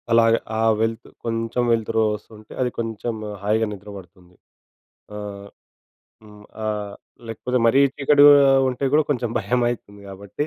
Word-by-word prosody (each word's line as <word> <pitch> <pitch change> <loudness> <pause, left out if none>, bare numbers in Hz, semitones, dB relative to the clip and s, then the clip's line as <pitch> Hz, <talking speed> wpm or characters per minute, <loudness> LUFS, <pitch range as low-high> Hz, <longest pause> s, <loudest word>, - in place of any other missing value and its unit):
అలాగ 115 0 +5 0.3
ఆ - - +1 0.2
వెల్త్ 115 +1 -2 0.2
కొంచెం 115 +1 -2
వెల్తురోస్తుంటే 110 -1 -2
అది 125 - +1
కొంచెం 115 0 -4 0.3
హాయిగా 110 +2 +1
నిద్ర 105 0 -10
పడుతుంది. 90 -1 -16 0.8
ఆహ్, 100 -1 -8 0.8
హ్మ్, 105 -1 -16 0.2
ఆహ్, 105 -1 -3 0.3
లేకపోతే 125 +3 -2
మరీ 130 +4 +4 0.2
చీకటిగా 145 +1 +6 0.4
ఉంటే 130 +2 -3
గూడా 155 +1 +4
కొంచెం 120 -4 -1
భయమయతుంది 120 -4 -2
గాబట్టి. 100 +9 -6
115 Hz, 120 wpm, -22 LUFS, 105-120 Hz, 0.8 s, చీకటిగా